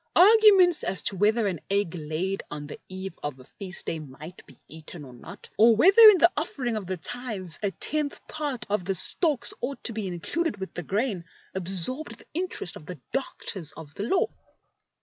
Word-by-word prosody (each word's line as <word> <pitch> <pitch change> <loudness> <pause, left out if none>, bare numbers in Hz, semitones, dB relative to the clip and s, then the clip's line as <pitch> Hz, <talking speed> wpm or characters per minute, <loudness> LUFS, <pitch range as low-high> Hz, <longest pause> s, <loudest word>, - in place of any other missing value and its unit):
Arguments 390 -4 +6
as 190 - -2
to 200 - +2
whether 215 +4 +2
an 185 -5 -2
egg 200 -3 0
laid 170 +4 -4
on 150 0 -7
the 145 - -10
eve 190 0 -7
of 145 -3 -6
a - - -13
feast 180 +6 -9
day 165 - -3
might 155 +4 -12
be - - -18
eaten 160 0 -11
or 130 - -13
not, 120 - -13
or 225 +1 +6
whether 385 - +5
in 410 - +5
the 345 0 +4
offering 265 -6 -3
of 205 -4 -5
the 185 0 -3
tithes 205 -3 -5
a 205 - 0
tenth 295 +8 -3
part 290 -6 -5
of 205 -2 -1
the 190 +2 -2
stalks 265 - +3
ought 270 +3 -5
to 235 - -2
be 215 -2 -4
included 205 - -3
with 190 0 -7
the - - -5
grain, 200 - -2 0.3
absorbed 190 - +4
the - - -17
interest 345 - -5
of 150 - -15
the 180 -5 -8
Doctors 195 - -4
of 155 -2 -12
the - - -7
Law. 355 - +1
200 Hz, 195 wpm, -25 LUFS, 175-270 Hz, 0.3 s, Arguments